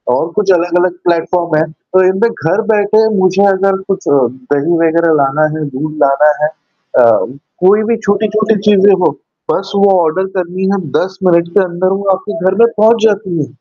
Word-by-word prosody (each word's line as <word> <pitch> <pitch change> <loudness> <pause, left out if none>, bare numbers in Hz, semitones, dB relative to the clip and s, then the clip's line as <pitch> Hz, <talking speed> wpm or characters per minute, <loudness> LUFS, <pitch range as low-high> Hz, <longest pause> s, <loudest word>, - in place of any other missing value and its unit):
और 145 - -1
कुछ 200 -2 +1
अलग-अलग 175 +1 0 0.2
प्लेटफॉर्म 170 0 0
हैं। 155 +1 -1
तो 185 +3 -1
इनमें 190 +5 +1
घर 185 +2 -2
बैठे 215 +1 +2
मुझे 185 +1 +2
अगर 195 0 0
कुछ 195 0 -3
दही 140 +4 0
वगैरह 165 0 +2
लाना 140 +3 +1
है, 155 - -4
दूध 150 +3 -4
लाना 140 +2 +3
है - - +3 0.5
अ, - - +6 0.6
कोई 210 +3 +4
भी 230 - +1
छोटी-छोटी 215 +2 0
चीज़ें 200 0 +4
हो, - - +2 0.4
बस 195 +1 -3
वो 200 0 +3
ऑर्डर 170 +4 -1
करनी 180 +1 -4
है - - 0
और 190 -3 -4 0.2
10 190 +1 -5
मिनट 170 -2 +2
के 200 - +4
अंदर 180 +1 -2
वो 200 0 -3
आपके 210 +3 -7
घर 190 0 +1
में - - +6
पहुँच 220 +1 +3
जाती 200 -5 -1
है। - - -8
185 Hz, 185 wpm, -13 LUFS, 165-200 Hz, 0.6 s, अ